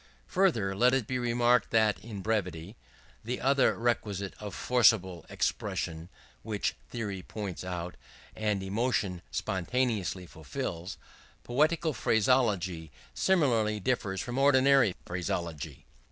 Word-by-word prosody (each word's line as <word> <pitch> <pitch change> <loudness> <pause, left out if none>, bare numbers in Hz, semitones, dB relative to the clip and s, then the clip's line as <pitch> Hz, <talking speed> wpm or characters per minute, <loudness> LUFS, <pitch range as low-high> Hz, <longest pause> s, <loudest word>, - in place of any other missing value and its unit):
Further, 120 - +2
let 125 +5 +4
it 130 -4 0
be 125 +3 -2
remarked 120 -1 +2
that 110 -3 +3
in 105 -4 -8
brevity 95 -3 -2 0.5
the 125 +3 -3
other 135 +1 +3
requisite 105 -5 -1
of 105 -3 -6
forcible 105 -8 +3
expression 80 +2 -2 0.3
which 105 -2 -2 0.2
theory 105 -5 -4
points 100 -2 -6
out, 90 -1 -5 0.4
and 105 -3 -1
emotion 100 -3 -1
spontaneously 100 -1 -1
fulfils 80 +3 -6 0.5
poetical 155 +5 +1
phraseology 100 - +1 0.2
similarly 115 - +2
differs 100 -4 -1
from 125 +2 -3
ordinary 135 -6 +5
phraseology. 80 -5 -4
105 Hz, 110 wpm, -30 LUFS, 90-125 Hz, 0.5 s, ordinary